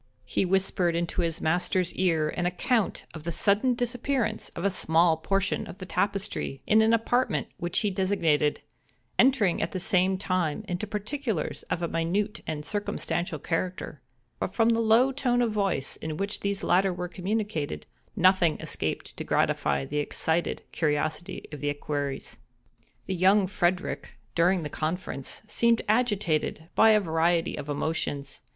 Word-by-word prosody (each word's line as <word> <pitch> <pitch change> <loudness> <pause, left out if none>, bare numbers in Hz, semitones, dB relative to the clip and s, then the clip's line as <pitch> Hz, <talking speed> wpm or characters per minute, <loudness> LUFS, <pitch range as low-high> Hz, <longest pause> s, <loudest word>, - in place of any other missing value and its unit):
He - - 0
whispered 185 -2 +1
into 170 +1 -1
his 165 -1 -1
master's 180 +2 +1
ear 165 -4 +2
an 175 +2 -1
account 205 +5 0
of 160 - -7
the 170 +2 -3
sudden 210 +8 +2
disappearance 245 -1 -1
of 170 - -3
a 200 - +3
small 165 -2 +3
portion 195 +4 0
of - - -9
the 185 - -7
tapestry, 195 -9 -2
in 220 +1 +5
an 220 +1 +4
apartment 230 - +1
which 175 0 -1
he 210 - +1
designated; 170 -6 +1 0.6
entering, 240 -9 +4
at 165 - -2
the 185 - -2
same 185 +1 +2
time, 185 -1 -1
into 180 +4 -3
particulars 215 - -3
of 175 - -1
a - - +1
minute 195 +7 -1
and 150 -1 -3
circumstantial 175 -5 -2
character; 165 -2 -3 0.4
but - - -3
from 225 -1 +4
the 230 0 +3
low 230 +4 +4
tone 255 -3 +1
of 240 -2 +2
voice 195 -10 -1
in 155 -1 -5
which 200 +3 -2
these 200 0 -2
latter 190 +2 +3
were 180 0 -4
communicated, 185 -3 -3 0.3
nothing 185 -4 +4
escaped - - -4
to - - -3
gratify 70 -1 +1
the 150 - -2
excited 160 +3 -1
curiosity 155 +3 -1
of 150 - -7
the 145 - 0
equerries. 145 -1 -3 0.7
The - - -2
young 190 +3 +4
Frederick, 180 -6 -1 0.2
during 175 +1 +3
the - - -2
conference, 155 -3 -4
seemed 230 +1 +2
agitated 205 -8 +1
by 225 - +6
a 215 -1 +6
variety 165 -1 +1
of 145 0 -7
emotions. 145 -2 -2
185 Hz, 155 wpm, -27 LUFS, 160-210 Hz, 0.7 s, by